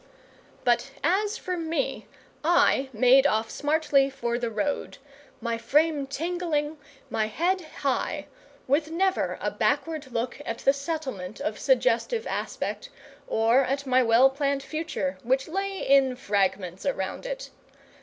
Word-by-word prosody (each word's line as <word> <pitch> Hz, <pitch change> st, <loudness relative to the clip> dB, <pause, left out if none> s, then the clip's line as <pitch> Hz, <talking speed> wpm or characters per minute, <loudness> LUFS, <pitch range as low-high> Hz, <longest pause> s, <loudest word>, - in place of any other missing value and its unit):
But 240 Hz, +1 st, +2 dB
as 405 Hz, +7 st, +1 dB
for 365 Hz, -, -3 dB
me, 325 Hz, -4 st, -2 dB, 0.4 s
I 305 Hz, -5 st, +3 dB
made 255 Hz, +4 st, +5 dB
off 220 Hz, -3 st, 0 dB
smartly 290 Hz, -2 st, +2 dB
for 240 Hz, -3 st, -2 dB
the 240 Hz, -1 st, -1 dB
road, 225 Hz, +7 st, -2 dB, 0.4 s
my 230 Hz, -1 st, -2 dB
frame 290 Hz, +4 st, +2 dB
tingling, 315 Hz, 0 st, -2 dB, 0.3 s
my 215 Hz, -1 st, +1 dB
head 355 Hz, -, 0 dB, 0.2 s
high, 270 Hz, -2 st, 0 dB, 0.4 s
with 295 Hz, +4 st, +1 dB
never 375 Hz, +3 st, 0 dB
a -, -, -1 dB
backward 310 Hz, -5 st, -1 dB
look 245 Hz, +4 st, -3 dB
at 230 Hz, -, -4 dB
the 275 Hz, -, +3 dB
Settlement 275 Hz, -, -5 dB
of 210 Hz, -, -3 dB
suggestive 265 Hz, -, +2 dB
aspect, -, -, -4 dB, 0.4 s
or 230 Hz, +4 st, +3 dB
at 275 Hz, +2 st, -2 dB
my 260 Hz, -1 st, +4 dB
well 245 Hz, +3 st, +5 dB
planned 280 Hz, 0 st, -1 dB
future 290 Hz, -, -3 dB
which 265 Hz, +3 st, 0 dB
lay 390 Hz, +3 st, -3 dB
in 270 Hz, -2 st, +5 dB
fragments 195 Hz, -5 st, -1 dB
around 270 Hz, -, -2 dB
it. -, -, -5 dB
275 Hz, 135 wpm, -26 LUFS, 235-320 Hz, 0.4 s, made